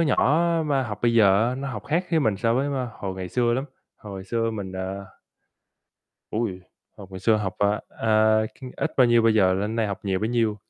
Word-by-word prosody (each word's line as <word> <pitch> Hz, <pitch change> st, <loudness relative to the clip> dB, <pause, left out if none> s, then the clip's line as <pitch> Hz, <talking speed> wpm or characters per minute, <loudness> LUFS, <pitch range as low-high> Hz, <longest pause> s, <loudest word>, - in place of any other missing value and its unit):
nhỏ 155 Hz, +1 st, +3 dB, 0.2 s
mà 140 Hz, -2 st, +1 dB
học 105 Hz, -3 st, -5 dB
bây 120 Hz, -1 st, +2 dB
giờ 105 Hz, +1 st, +5 dB
á, 125 Hz, -, -2 dB
nó 135 Hz, +1 st, -5 dB
học 105 Hz, -6 st, -6 dB
khác 165 Hz, +5 st, 0 dB
với 160 Hz, -2 st, +3 dB
mình 110 Hz, -7 st, +1 dB
so 115 Hz, +3 st, +1 dB
với, 135 Hz, +3 st, +1 dB
a, 130 Hz, -3 st, -2 dB
hồi 95 Hz, -2 st, -4 dB
ngày 95 Hz, -1 st, -6 dB
xưa 120 Hz, +1 st, +1 dB
lắm, 130 Hz, +3 st, -1 dB, 0.3 s
hồi 100 Hz, -2 st, -9 dB
xưa 115 Hz, +2 st, -1 dB
mình, 100 Hz, -4 st, -6 dB
à 95 Hz, +1 st, -5 dB, 1.3 s
Ôi, 105 Hz, -5 st, -2 dB, 0.4 s
hồi 100 Hz, -, -10 dB
ngày 95 Hz, -1 st, -8 dB
xưa 110 Hz, -1 st, +3 dB
học, 105 Hz, -3 st, -3 dB
à, 100 Hz, +1 st, +1 dB
à, 110 Hz, 0 st, +2 dB
c -, -, -16 dB, 0.2 s
ít -, -, -1 dB
bao 130 Hz, -2 st, +6 dB
nhiêu 120 Hz, -1 st, +4 dB
bây 115 Hz, -1 st, +4 dB
giờ 95 Hz, -3 st, +4 dB
lên 105 Hz, +4 st, -2 dB
đây 115 Hz, -, +1 dB
học 100 Hz, -2 st, -4 dB
nhiều 95 Hz, -2 st, 0 dB
bấy 110 Hz, +3 st, -1 dB
nhiêu. 115 Hz, -3 st, +1 dB
110 Hz, 230 wpm, -24 LUFS, 100-120 Hz, 1.3 s, bao